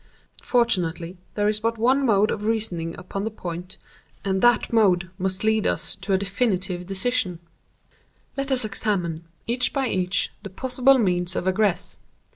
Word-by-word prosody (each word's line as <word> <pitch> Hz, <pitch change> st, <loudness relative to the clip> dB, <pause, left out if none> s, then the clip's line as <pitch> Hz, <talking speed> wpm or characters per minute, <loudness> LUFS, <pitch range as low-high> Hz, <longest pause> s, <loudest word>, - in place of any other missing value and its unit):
Fortunately, 180 Hz, -7 st, +1 dB, 0.2 s
there 205 Hz, 0 st, +1 dB
is 210 Hz, 0 st, +1 dB
but 230 Hz, +1 st, -1 dB
one 260 Hz, +5 st, +2 dB
mode 210 Hz, -1 st, +3 dB
of 210 Hz, -, -4 dB
reasoning 195 Hz, -7 st, -2 dB
upon 185 Hz, +2 st, -5 dB
the 220 Hz, -, -1 dB
point, 180 Hz, -4 st, -7 dB, 0.5 s
and 190 Hz, -1 st, 0 dB
that 240 Hz, -1 st, +3 dB
mode 190 Hz, -5 st, +3 dB
must 185 Hz, +1 st, -2 dB
lead 220 Hz, -1 st, +2 dB
us -, -, 0 dB
to 200 Hz, -, -5 dB
a 190 Hz, -, +4 dB
definite 190 Hz, -3 st, -1 dB
decision. 195 Hz, -2 st, 0 dB, 1.0 s
Let 275 Hz, 0 st, -3 dB
us 255 Hz, -3 st, +6 dB
examine, 175 Hz, -6 st, -1 dB, 0.2 s
each 245 Hz, +2 st, 0 dB
by 270 Hz, -3 st, 0 dB
each, 185 Hz, 0 st, 0 dB
the 200 Hz, -, -8 dB
possible 260 Hz, +6 st, +3 dB
means 180 Hz, -5 st, +1 dB
of 185 Hz, -, -2 dB
egress. 195 Hz, 0 st, 0 dB
200 Hz, 155 wpm, -24 LUFS, 180-230 Hz, 1.0 s, us